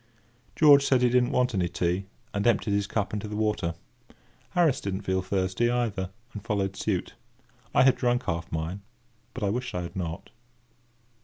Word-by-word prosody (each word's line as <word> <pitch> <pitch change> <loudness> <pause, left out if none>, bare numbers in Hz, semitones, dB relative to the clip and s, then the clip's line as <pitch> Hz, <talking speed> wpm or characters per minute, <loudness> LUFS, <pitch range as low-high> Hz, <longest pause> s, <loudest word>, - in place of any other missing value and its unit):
George 145 -3 +7
said 130 -3 +3
he 125 - +4
didn't 125 0 +3
want 125 -3 +1
any 90 -3 0
tea, 90 +3 -1 0.3
and 100 +3 0
emptied 110 -2 +2
his 100 -1 +1
cup 105 -1 -2
into 105 0 -3
the 105 - -5
water. 105 -6 0 0.8
Harris 155 -6 +3
did 100 -1 -2
not 100 +1 -6
feel 95 0 +1
thirsty, 95 +4 0
either, 110 -6 -1 0.2
and 105 - -7
followed 95 -2 -1
suit. 95 -2 -2 0.6
I - - +6
had 130 -1 +5
drunk 125 0 +1
half 85 0 -3
mine, 80 +5 -3 0.5
but 125 - -4
I 100 - +1
wished 125 0 -3
I 90 - -2
had 85 - -8
not. 85 -3 -5
100 Hz, 180 wpm, -27 LUFS, 95-125 Hz, 0.8 s, George